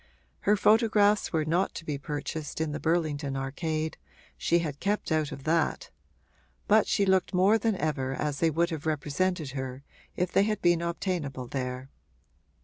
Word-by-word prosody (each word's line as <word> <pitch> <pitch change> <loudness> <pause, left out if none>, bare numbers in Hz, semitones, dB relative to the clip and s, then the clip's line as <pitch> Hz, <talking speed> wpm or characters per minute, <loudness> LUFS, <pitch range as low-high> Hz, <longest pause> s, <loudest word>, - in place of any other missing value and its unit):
Her 210 - +5
photographs 210 -1 +4
were 160 -2 0
not 170 +5 0
to 165 - -7
be 145 -3 -3
purchased 150 +1 -5
in 160 -1 -1
the 150 - -4
Burlington 155 -4 0
Arcade 155 +4 -3 0.4
she 170 - +2
had 155 -4 -3
kept 205 -3 -1
out 155 -1 +1
of 140 -2 -8
that; 165 +2 0 0.8
but 215 0 +5
she 200 - +2
looked 190 0 +2
more 195 +5 +4
than 220 -1 +1
ever 135 -6 -1
as 145 -1 -2
they 165 - +3
would 170 +2 +1
have 160 -1 -4
represented 155 +1 -1
her 130 0 -5 0.3
if 180 0 -1
they - - +4
had 215 0 0
been 175 -1 +3
obtainable 170 -6 -3
there. 130 +1 -4
160 Hz, 165 wpm, -28 LUFS, 145-185 Hz, 0.8 s, Her